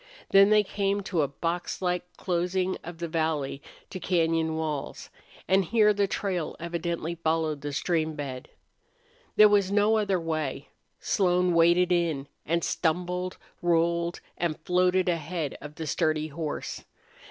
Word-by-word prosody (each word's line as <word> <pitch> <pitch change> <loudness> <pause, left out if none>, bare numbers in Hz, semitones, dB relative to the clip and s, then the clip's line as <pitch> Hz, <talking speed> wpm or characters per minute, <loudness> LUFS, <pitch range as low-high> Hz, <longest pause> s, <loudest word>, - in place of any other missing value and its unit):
Then 195 +1 +7
they 210 0 +5
came 200 0 -1
to 185 -4 -1
a 145 - +1
boxlike 175 +4 -2 0.2
closing 180 +1 0
of 175 0 -8
the 170 0 -4
valley 155 -4 -1 0.3
to 185 - -5
cañon 165 -3 +1
walls, 155 -3 -4 0.4
and 190 +1 +4
here 210 +3 +4
the 200 -1 +1
trail 185 -4 -2
evidently 170 0 -3
followed 160 -3 -1
the 145 - -4
stream 160 +1 0
bed. 135 -4 -6 0.9
There 215 - +8
was 200 -2 +3
no 210 +2 +4
other 200 -4 +1
way. 155 -4 -3 0.3
Slone 180 -2 +2
waded 170 +2 +4
in, 165 -6 +1 0.2
and 170 +2 +1
stumbled, 180 +2 -1 0.2
rolled, 170 0 +1 0.2
and 170 -3 -1
floated 180 +2 +2
ahead 165 -2 -2
of 150 +1 -9
the 160 - -5
sturdy 155 +1 0
horse. 155 0 -5
170 Hz, 140 wpm, -27 LUFS, 160-185 Hz, 0.9 s, There